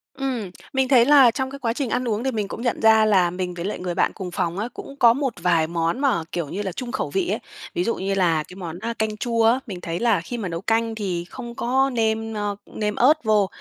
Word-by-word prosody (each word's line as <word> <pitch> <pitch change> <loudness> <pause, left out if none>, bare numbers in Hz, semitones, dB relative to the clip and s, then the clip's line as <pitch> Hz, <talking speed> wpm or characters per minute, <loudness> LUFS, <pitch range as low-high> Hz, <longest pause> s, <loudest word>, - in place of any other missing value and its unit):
Ừm, 255 -7 -3 0.2
mình 265 -1 +1
thấy 255 -3 +6
là 275 -3 +7
trong 265 +3 -3
cái 275 - -8
quá 235 -4 -1
trình 255 0 -3
ăn 250 +1 -1
uống 225 +2 -1
thì 265 - +1
mình 210 -3 -2
cũng - - -6
nhận 240 - -1
ra 220 -1 +6
là 190 -5 +4
mình 180 0 -4
với 170 -1 -6
lại 205 - -3
người 180 -1 -3
bạn - - +1
cùng 185 -3 -6
phòng 175 +1 -2
á, 220 +4 -2
cũng 275 - -9
có 235 -3 +7
một 270 0 -1
vài 165 -3 +3
món 165 +6 -1
mà, 255 - +1
kiểu 170 -4 -2
như 200 +7 -4
là, 190 - -3
chung 240 +5 -6
khẩu 260 - -2
vị 380 -2 0
ấy. - - 0 0.4
Ví 355 - 0
dụ 230 - 0
như 195 +1 -2
là 170 -5 +2
cái 180 - -12
món, 175 -3 -6
a, 230 +4 -4
canh 220 -1 -2
chua 230 +1 0
á, 240 +3 +4
mình 185 -4 -6
thấy 170 0 -4
là 230 -6 +3
khi 240 +8 -6
mà 200 -5 -3
nấu 165 -1 -4
canh 225 +2 0
thì 185 -5 -3
không 240 -2 -8
có 265 +3 +1
nêm, 225 -1 0
ơ, 205 -1 -2
nêm 210 -1 -3
ớt 280 +4 +3
vô 210 -2 +3
220 Hz, 275 wpm, -23 LUFS, 185-245 Hz, 0.4 s, là